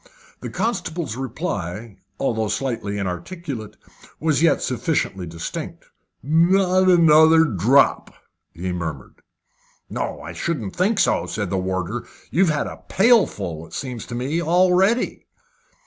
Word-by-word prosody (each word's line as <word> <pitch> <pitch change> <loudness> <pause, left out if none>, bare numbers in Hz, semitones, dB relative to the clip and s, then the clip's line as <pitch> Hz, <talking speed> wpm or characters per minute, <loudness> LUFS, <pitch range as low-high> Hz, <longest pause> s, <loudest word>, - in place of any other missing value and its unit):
The - - -6
constable's 175 - -2
reply, 115 - -5 0.2
although 110 -5 0
slightly 110 -2 -2
inarticulate, 110 - -5 0.4
was 155 -2 +1
yet 165 - +4
sufficiently 120 - -1
distinct. 80 0 -6 0.4
"Not 185 +5 +3
another 160 -2 +6
drop!" 125 - +3 0.4
he 90 +2 -4
murmured. 80 -6 -6 0.7
"No, - - -3
I 80 +4 -8
shouldn't 110 - -3
think 195 +4 +1
so," - - +2
said 105 -4 -3
the 95 - 0
warder. 95 +6 -3 0.2
"You've 175 +3 +3
had 150 -2 0
a - - -8
pailful, 105 - +2
it - - -18
seems 125 -4 -5
to 120 - -6
me, 140 +8 -1
already." 185 +7 +2
130 Hz, 120 wpm, -22 LUFS, -, 0.7 s, another